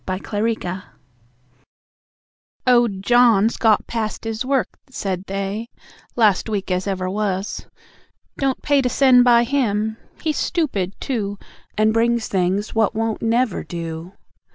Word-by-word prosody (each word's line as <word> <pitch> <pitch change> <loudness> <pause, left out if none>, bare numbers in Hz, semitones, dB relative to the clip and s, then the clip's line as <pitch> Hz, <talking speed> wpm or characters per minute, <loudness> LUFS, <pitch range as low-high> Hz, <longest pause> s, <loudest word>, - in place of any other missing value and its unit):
The 185 0 -1
Carrier 205 -4 -2 1.8
"Owd 240 -6 +3
John's 235 -2 +4
got 220 -2 +3
past 220 -2 -3
his 225 +1 -3
work," 265 0 -1
said 195 -7 -4
they, 195 +3 -3 0.5
Last 215 -3 +3
week 200 -3 -2
as 185 +2 -1
ever 185 -2 -2
was 195 0 -2 0.7
"don't 270 -2 -1
pay 285 -1 +3
To 250 - 0
send 255 -1 +5
by 240 -1 +5
him. 220 -4 0 0.2
He's 310 -2 -1
stoopid, 210 - -1
too, 205 -7 -3 0.4
And 215 +1 +3
brings 235 0 +1
things 190 +2 0
what 225 -1 +1
won't 225 0 -1
never 230 -2 +1
do. 165 +1 -6
220 Hz, 130 wpm, -21 LUFS, 195-240 Hz, 1.8 s, send